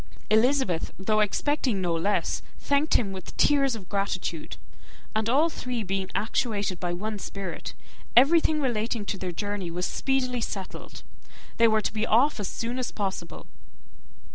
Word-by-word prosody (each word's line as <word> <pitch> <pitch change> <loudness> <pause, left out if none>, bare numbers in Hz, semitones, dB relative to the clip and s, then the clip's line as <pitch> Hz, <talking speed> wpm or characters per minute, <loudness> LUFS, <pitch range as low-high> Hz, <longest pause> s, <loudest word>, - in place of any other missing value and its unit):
Elizabeth, 220 - +3
though 215 +3 +1
expecting 240 +2 +1
no 175 -2 0
less, 165 +5 0 0.2
thanked 285 +2 +1
him 200 -5 +2
with 190 -2 -8
tears 275 -4 +4
of 195 -5 -9
gratitude; 190 -5 -2 0.6
and 220 +1 +1
all 290 +7 +4
three 250 -7 -3
being 190 -1 -2
actuated 205 -4 0
by 175 -1 -2
one 210 +4 -3
spirit, 195 -2 -6 0.4
everything 310 +4 +6
relating 230 -4 -1
to 200 - -2
their 185 -1 -3
journey 205 0 -3
was 180 +2 -2
speedily 255 -2 0
settled. 195 -4 -6 0.5
They 230 - +6
were 220 -1 +3
to - - -2
be 220 +1 -1
off 245 +4 +4
as 205 - -2
soon 235 +6 -3
as 255 - -2
possible. 195 -2 -4
215 Hz, 150 wpm, -27 LUFS, 195-250 Hz, 0.6 s, everything